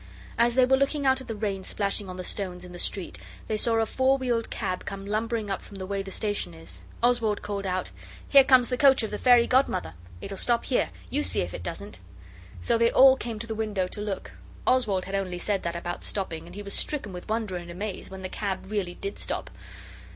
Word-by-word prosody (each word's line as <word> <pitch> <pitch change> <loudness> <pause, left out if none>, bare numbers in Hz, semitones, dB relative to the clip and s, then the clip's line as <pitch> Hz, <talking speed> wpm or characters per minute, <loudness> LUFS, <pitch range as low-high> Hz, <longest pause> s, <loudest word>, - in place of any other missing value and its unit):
As 235 0 +3
they 255 -1 +6
were 265 +1 +4
looking 275 +1 0
out 265 0 +4
at - - -11
the 225 - -4
rain 200 -3 -2
splashing 200 0 -1
on 185 - -7
the 185 - -5
stones 180 -2 -4
in 180 - -11
the 175 - -8
street 190 0 -3 0.3
they 215 - 0
saw 230 +2 +3
a 225 0 +3
four 260 +4 +2
wheeled 240 -3 -1
cab 185 -5 -3
come 195 0 -6
lumbering 215 0 -1
up 195 - -2
from 200 - -13
the 190 - -5
way 200 +1 -2
the 195 - -7
station 200 - -2
is. 85 +2 -11 0.2
Oswald 235 -4 +2
called 200 -1 -3
out 185 0 -2 0.4
'Here 275 -1 +8
comes 255 -2 +5
the 250 - 0
coach 270 -4 +6
of 220 - -3
the 210 - -4
Fairy 245 -2 +6
Godmother. 250 - +1 0.3
It'll 195 - -6
stop 235 +2 +1
here, 255 - +1 0.2
you 285 +3 +1
see - - +3
if 85 - -4
it - - -5
doesn't!' 200 - -6 0.6
So 155 - +2
they 230 0 +5
all 265 +1 +7
came 235 -4 -5
to 225 - -5
the 225 - -4
window 210 -4 -1
to 205 - -4
look. 205 -2 -4 0.3
Oswald 220 -8 +2
had 195 - -7
only 190 -2 -1
said 195 +2 0
that 170 0 -3
about 175 0 -4
stopping 170 -5 -4
and 175 - -11
he 205 - -6
was 200 - -3
stricken 265 -10 0
with 180 +2 -8
wonder 220 -4 -1
and 175 -1 -6
amaze 190 +3 -5
when 190 0 -8
the - - -2
cab 190 0 -4
really 190 -4 -2
did 395 - -6
stop. - - -3
205 Hz, 235 wpm, -27 LUFS, 185-235 Hz, 0.6 s, Here